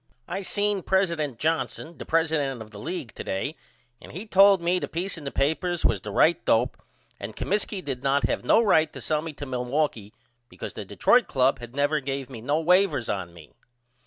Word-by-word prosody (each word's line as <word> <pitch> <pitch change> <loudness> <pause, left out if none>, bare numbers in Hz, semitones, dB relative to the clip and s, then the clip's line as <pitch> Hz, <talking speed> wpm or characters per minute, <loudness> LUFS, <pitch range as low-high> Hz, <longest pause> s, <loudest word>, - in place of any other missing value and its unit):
I 195 - -3
seen 205 0 0
president 170 - 0
Johnson 160 +2 -2
the - - -8
president 155 -5 +1
of 110 -1 -10
the 105 - -10
league 160 - -5
to - - -7
day 140 +11 -3 0.5
and - - -12
he 190 +7 -7
told 195 -2 +6
me 175 +2 +1
the - - -4
peace 180 +4 -3
in 160 -4 -10
the 140 - -3
papers 165 +5 0
was 105 -5 +2
the 105 - -7
right 160 +11 +3
dope 120 +3 +1 0.4
and - - -7
Comiskey 200 -1 -2
did 130 -3 -3
not 140 0 +1
have 115 - 0
no 220 - +4
right 160 -7 +3
to - - -8
sell 155 -1 0
me 165 0 -5
to 145 - -7
Milwaukee 125 -4 -2 0.4
because - - -7
the - - -7
Detroit - - +3
Club 130 +1 +2
had 120 +1 -10
never 145 +2 +2
gave 135 -1 -4
no 130 +6 -1
wavers 170 - +2
on 95 -4 -3
me. 85 -3 -15
150 Hz, 200 wpm, -26 LUFS, 125-175 Hz, 0.5 s, told